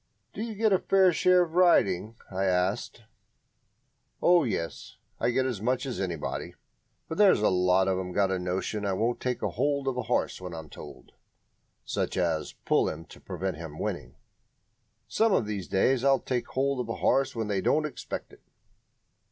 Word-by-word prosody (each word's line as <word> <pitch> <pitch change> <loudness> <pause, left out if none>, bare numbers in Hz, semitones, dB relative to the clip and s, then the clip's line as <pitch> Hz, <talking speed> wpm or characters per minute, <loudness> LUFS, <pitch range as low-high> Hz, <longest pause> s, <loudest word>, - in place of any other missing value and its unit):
"Do - - -6
you 225 -1 -4
get 215 0 +2
a 190 - +4
fair 190 -2 +4
share 180 +2 +4
of 165 - -6
the 170 - -5
riding?" 110 - +3 0.2
I 95 +1 -1
asked. 95 +5 -1 1.2
"Oh, 175 -1 +5
yes; 85 -10 -4 0.2
I - - +1
get 130 +2 +1
as 120 -7 -3
much 125 +4 0
as 130 - -4
anybody. 85 -5 -4 0.5
But 160 - -5
there's 195 - +5
a - - +5
lot 90 0 +3
of 95 -1 +1
'em 90 -1 -5
got 95 +1 +1
a 95 - 0
notion 95 +4 -3
I 100 -1 0
won't 115 +5 0
take 125 -1 -2
hold 140 -1 -1
of 130 -2 -1
a - - 0
horse 120 -4 -1
when 90 -2 -6
I'm 80 -2 -9
told - - -11 0.8
(i.e., 85 -4 0 0.2
pull - - +3
him 80 +2 -7
to - - -15
prevent 95 -2 -4
him 80 -2 -8
winning). 60 -4 -4 0.9
Some 220 -2 +2
of 115 - +2
these 100 -4 -4
days 125 +6 +2
I'll 135 0 +5
take 125 -1 -3
hold 135 0 -1
of 120 -2 -3
a 115 - -2
horse 135 0 +1
when 110 -2 -2
they 100 -2 0
don't 155 +9 +2
expect 150 - -6
it." - - -17
110 Hz, 185 wpm, -28 LUFS, 95-140 Hz, 1.2 s, Oh